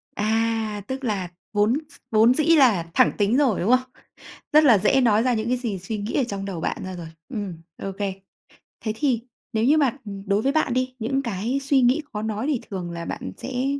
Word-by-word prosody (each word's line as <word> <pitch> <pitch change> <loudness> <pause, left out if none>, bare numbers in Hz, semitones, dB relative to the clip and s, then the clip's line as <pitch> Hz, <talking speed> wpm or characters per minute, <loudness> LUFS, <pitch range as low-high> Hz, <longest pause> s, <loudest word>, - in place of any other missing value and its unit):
À, 220 0 0
tức 265 +2 -5
là 200 -6 -1 0.2
vốn 210 +3 +3 0.2
s - - -15
vốn 225 +3 +5
dĩ 305 - +1
là 210 - +4
thẳng - - +5
tính 210 +3 +2
rồi, 265 -8 +2
đúng 195 - 0
không? 255 +1 +3 0.6
Rất 305 +1 +7
là 230 -7 +7
dễ 215 +7 +3
nói 225 -3 +4
ra 250 0 +2
những 220 0 -2
cái 250 - +2
gì 230 -6 -3
suy 210 +4 -5
nghĩ 205 +2 -4
ở 275 - +2
trong 200 -4 -5
đầu 185 -5 -5
bạn - - -1
ra 185 0 -5
rồi. 170 -2 -7 0.2
Ừm, 205 -8 -4 0.3
ô 195 - -3
kê. 200 -2 -1 0.7
Thế 215 - 0
thì 250 -3 +1 0.3
nếu 220 - +1
như 290 +6 +5
mà 275 -3 +2 0.3
đối 200 +1 +1
với 270 - +1
bạn 310 -4 +1
đi, 255 0 -1
những 270 +5 0
cái 230 +2 -2
suy 275 -1 +3
nghĩ 250 +6 +3
khó 210 - -3
nói 220 +3 -2
thì 285 -6 0
thường 180 -3 -4
là 170 0 -5
bạn - - -5
sẽ 255 0 -3
225 Hz, 225 wpm, -24 LUFS, 205-255 Hz, 0.7 s, Rất